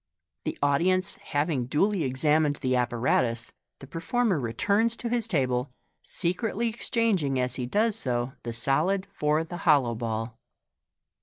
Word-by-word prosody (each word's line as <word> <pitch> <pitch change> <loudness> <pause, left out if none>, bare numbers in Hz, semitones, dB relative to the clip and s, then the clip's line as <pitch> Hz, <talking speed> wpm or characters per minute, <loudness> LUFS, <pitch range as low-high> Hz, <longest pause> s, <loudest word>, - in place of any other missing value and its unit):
The - - -3
audi 145 +5 +3
ence 185 0 +1
having 145 -4 -1
duly 195 +8 +1
examined 150 +3 +2
the 130 -2 -1
ap 125 -1 +1
paratus, 115 -1 0 0.3
the - - -11
performer 185 - 0
returns 205 - +1
to 235 - -4
his 235 -2 0
table, 130 - 0 0.3
secretly 225 +6 -1
exchanging 215 - 0
as 125 -1 +1
he 125 -2 -3
does 215 - +2
so 125 - -1
the 120 - -5
solid 155 +12 +1
for 150 -1 +1
the 175 +2 -7
hollow 145 -8 +3
ball. 115 0 -4
150 Hz, 145 wpm, -27 LUFS, 125-195 Hz, 0.3 s, audi